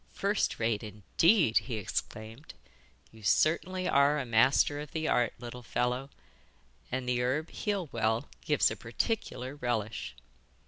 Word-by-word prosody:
'First 200 Hz, +1 st, 0 dB
rate, 110 Hz, -2 st, 0 dB
indeed!' 110 Hz, -, +3 dB
he 125 Hz, -, -5 dB
exclaimed. 110 Hz, +5 st, -5 dB, 0.6 s
'You 110 Hz, -, -15 dB
certainly 180 Hz, -, +2 dB
are 140 Hz, +2 st, +4 dB
a 140 Hz, -, -2 dB
master 130 Hz, +5 st, +3 dB
of 150 Hz, 0 st, -8 dB
the 160 Hz, -1 st, -1 dB
art, 120 Hz, -2 st, +2 dB
little 120 Hz, +1 st, -8 dB
fellow, 125 Hz, +3 st, -1 dB, 0.8 s
and 130 Hz, 0 st, -2 dB
the 125 Hz, -1 st, +1 dB
herb 140 Hz, +6 st, -1 dB
heal 200 Hz, -5 st, -2 dB
well 110 Hz, +2 st, 0 dB, 0.2 s
gives -, -, +3 dB
a -, -, -3 dB
particular 130 Hz, -, -3 dB
relish. 110 Hz, -, -3 dB
125 Hz, 135 wpm, -30 LUFS, 115-150 Hz, 0.8 s, are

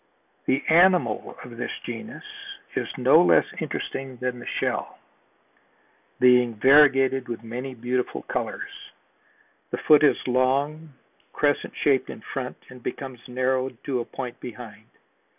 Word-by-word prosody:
The 135 Hz, +2 st, +1 dB
animal 170 Hz, -, +3 dB
of 120 Hz, -2 st, -11 dB
this 120 Hz, -, -3 dB, 0.2 s
genus 170 Hz, -, -7 dB, 0.5 s
is -, -, -1 dB
no -, -, +6 dB
less -, -, +5 dB
interesting 135 Hz, -2 st, -4 dB
than 125 Hz, 0 st, -3 dB
the 120 Hz, -, -10 dB
shell, -, -, -2 dB, 1.2 s
being 125 Hz, -2 st, +5 dB
variegated 135 Hz, +1 st, +5 dB
with 115 Hz, -1 st, -6 dB
many 125 Hz, +3 st, -6 dB
beautiful 125 Hz, +1 st, -2 dB
colors. -, -, -4 dB, 1.0 s
The -, -, -3 dB
foot 150 Hz, -1 st, +5 dB
is 145 Hz, -, +5 dB
long, 140 Hz, +5 st, 0 dB, 0.4 s
crescent 145 Hz, -1 st, 0 dB
shaped 135 Hz, -3 st, +2 dB
in -, -, -8 dB
front 125 Hz, -2 st, -5 dB
and 125 Hz, -1 st, -12 dB
becomes 130 Hz, 0 st, -6 dB
narrowed 130 Hz, 0 st, -1 dB
to 130 Hz, -3 st, -1 dB
a 120 Hz, -, -3 dB
point 125 Hz, -2 st, -7 dB
behind. 110 Hz, -2 st, -10 dB
130 Hz, 130 wpm, -25 LUFS, 125-135 Hz, 1.2 s, no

